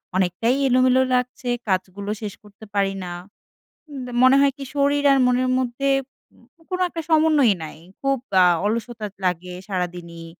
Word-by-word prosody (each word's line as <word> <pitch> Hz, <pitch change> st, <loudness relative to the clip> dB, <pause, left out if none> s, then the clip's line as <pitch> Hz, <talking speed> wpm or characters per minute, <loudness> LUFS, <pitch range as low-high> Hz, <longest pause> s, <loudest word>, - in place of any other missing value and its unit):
অনেকটাই 190 Hz, +7 st, +1 dB
এলোমেলো 255 Hz, 0 st, +4 dB
লাগছে, 250 Hz, 0 st, -1 dB, 0.2 s
কাজগুলো 190 Hz, +1 st, -2 dB
শেষ 205 Hz, -2 st, -5 dB
করতে 210 Hz, +1 st, -15 dB
পারি 195 Hz, -1 st, +1 dB
না, 175 Hz, -, -6 dB, 0.8 s
আম 275 Hz, -3 st, -7 dB, 0.2 s
মনে 260 Hz, +1 st, +7 dB
হয় 280 Hz, 0 st, +4 dB
কি 280 Hz, -, -7 dB
শরীর 285 Hz, 0 st, +2 dB
আর 275 Hz, -, +4 dB
মনের 255 Hz, +1 st, +1 dB
মধ্যে 260 Hz, +2 st, -1 dB, 0.8 s
কোনো 370 Hz, 0 st, -2 dB
একটা 330 Hz, -1 st, -5 dB
সমন্বয়ই 310 Hz, -, +4 dB
নাই, 155 Hz, -, -8 dB, 0.2 s
খুব 275 Hz, 0 st, +1 dB, 0.3 s
আ -, -, +6 dB, 0.2 s
অলসতা 225 Hz, +1 st, -2 dB, 0.2 s
লাগে 180 Hz, 0 st, -2 dB
সারাদিনই। 175 Hz, -3 st, -5 dB
240 Hz, 145 wpm, -22 LUFS, 190-275 Hz, 0.8 s, মনে